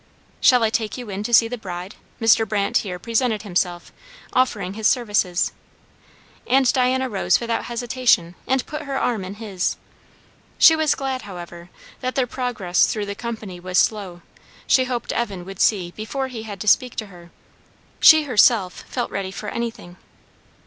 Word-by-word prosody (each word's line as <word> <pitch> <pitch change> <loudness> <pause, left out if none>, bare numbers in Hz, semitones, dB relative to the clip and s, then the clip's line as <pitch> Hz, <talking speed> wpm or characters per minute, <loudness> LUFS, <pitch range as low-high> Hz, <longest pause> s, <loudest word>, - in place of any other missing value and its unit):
"Shall 250 -3 +5
I 220 - +2
take 220 0 -2
you 245 -5 -7
in 195 +1 -4
to 215 - -4
see 230 -1 +6
the 245 +1 -6
bride?" 180 -1 -7 0.3
Mr. 225 -1 +4
Brandt 200 -2 +1
here 185 -4 -3
presented 225 +2 -1
himself, 175 -3 -2 0.4
offering 205 -7 0
his 215 0 0
services. 205 -7 +1 1.0
And 260 +1 +3
Diana 260 0 +1
rose 205 -6 +1
without 230 -1 -2
hesitation 240 -7 +1
and 265 -1 +1
put 300 - -6
her 275 -1 -4
arm 225 -7 -1
in 190 +2 -7
his. 205 -4 -3 0.8
She 320 - +7
was 315 -2 +2
glad, 265 -1 -3
however, 175 -3 -10 0.3
that 255 0 -3
their 260 - +2
progress 240 -8 0
through 210 -2 -2
the 200 - -4
company 215 -5 -6
was 180 +1 -3
slow; 190 -5 0 0.4
she 260 - +3
hoped 245 -2 -3
Evan 200 -7 -3
would 195 0 -9
see 185 -5 +2
before 260 +5 -4
he 235 -3 -7
had 210 -3 -8
to 210 - -5
speak 250 +4 +3
to 220 - -4
her. 175 -3 -15 0.7
She 315 -1 +8
herself 220 -7 +3
felt 245 - -3
ready 195 -1 -3
for 205 +2 -6
anything. 230 -6 -5
220 Hz, 170 wpm, -22 LUFS, 190-250 Hz, 1.0 s, She